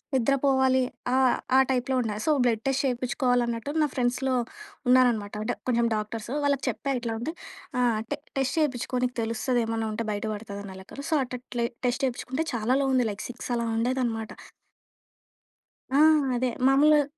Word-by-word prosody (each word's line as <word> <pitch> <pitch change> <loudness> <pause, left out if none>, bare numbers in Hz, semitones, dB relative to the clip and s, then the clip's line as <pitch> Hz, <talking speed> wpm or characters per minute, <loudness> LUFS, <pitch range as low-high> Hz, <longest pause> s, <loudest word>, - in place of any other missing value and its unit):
నిద్ర 265 +2 +3
పోవాలి 265 -1 +4 0.3
ఆహ్, 260 -1 +4 0.2
ఆ - - +8
టైప్‌లో 255 +1 0
ఉండేది. 215 -2 -3
సో, 310 - +4
బ్లడ్ 225 -2 +1
టెస్ట్ 270 +1 +1
చేపించుకోవాలన్నట్టు, 245 0 0
నా - - +3
ఫ్రెండ్స్‌లో 255 +1 0 0.5
ఉన్నారనమాట 240 -5 +4
అంటే - - -1
కొంచెం 235 -1 +2
డాక్టర్స్. 215 +2 -4
వాళ్ళకి 280 -2 +1
చెప్పా 275 -1 -2
ఇట్లా 230 -1 -2
ఉంటే 320 +6 -3 0.5
ఆహ్, 230 -3 +2
టె 290 - -2 0.2
టెస్ట్ 270 +4 -1
చేపించుకో 255 -3 -1
నీకు 250 - -4
తెలుస్తది. 230 +2 0
ఏమన్నా 225 -1 -1
ఉంటే 230 +1 -3
బయట 205 +1 -3
పడుతది 205 -1 -7
అన్నా 190 -1 -9
లెక్కలో. 280 +8 -9
సో, - - +4
అట్ 250 - -6
అట్లే 240 -1 -2 0.2
టెస్ట్ 250 +3 0
చేపించుకుంటే 260 +4 -2
చాలా 230 +3 +1
లో 270 - +1
ఉంది 250 -2 +3
లైక్ 200 - -7
6 245 0 -7
అలా 235 0 -1
ఉండేదనమాట. 235 -2 -1 1.6
ఆ! 275 - +2 0.4
అదే 250 +1 +1 0.2
మాములుగా 295 +2 +5
245 Hz, 165 wpm, -27 LUFS, 230-265 Hz, 1.6 s, ఆ